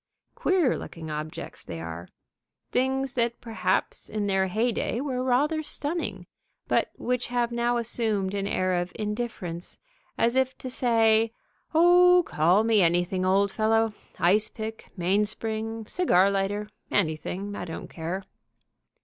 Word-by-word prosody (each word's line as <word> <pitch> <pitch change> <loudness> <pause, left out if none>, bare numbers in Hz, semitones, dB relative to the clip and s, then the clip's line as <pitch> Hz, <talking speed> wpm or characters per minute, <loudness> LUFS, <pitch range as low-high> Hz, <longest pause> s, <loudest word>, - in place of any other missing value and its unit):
Queer 355 -9 +2
looking 160 -2 -8
objects, 155 +1 -6
they 85 - -7
are; 85 +2 -7 0.6
things 265 +1 0
that 235 -2 0
perhaps 225 -2 -1
in 210 -1 -2
their 190 -1 +2
hey 225 +6 +1
dey 230 - -2
were 260 -2 -2
rather 290 +5 +2
stunning, 310 +2 -4 0.4
but - - +2
which 250 0 -1
have 240 -1 0
now 240 0 +1
assumed 220 -4 0
an 200 -1 -1
air 185 -2 0
of 175 - -5
indifference, 210 -6 -4 0.4
as 235 +2 +2
if 260 0 +1
to 255 - -6
say, 225 -3 +3 0.4
"Oh, 355 +2 +7
call 175 +7 +3
me 225 -2 +4
anything, 175 +2 +2
old 195 +2 +3
fellow, 225 +1 +2 0.2
Ice 205 +5 +3
pick, 220 0 -7
Mainspring, 215 +4 0
Cigar 200 - +3
lighter, 200 +1 -1 0.2
anything, 190 +3 -1
I 180 - -5
don't 165 -2 -7
care." 175 +4 -4
220 Hz, 135 wpm, -26 LUFS, 190-245 Hz, 0.6 s, Oh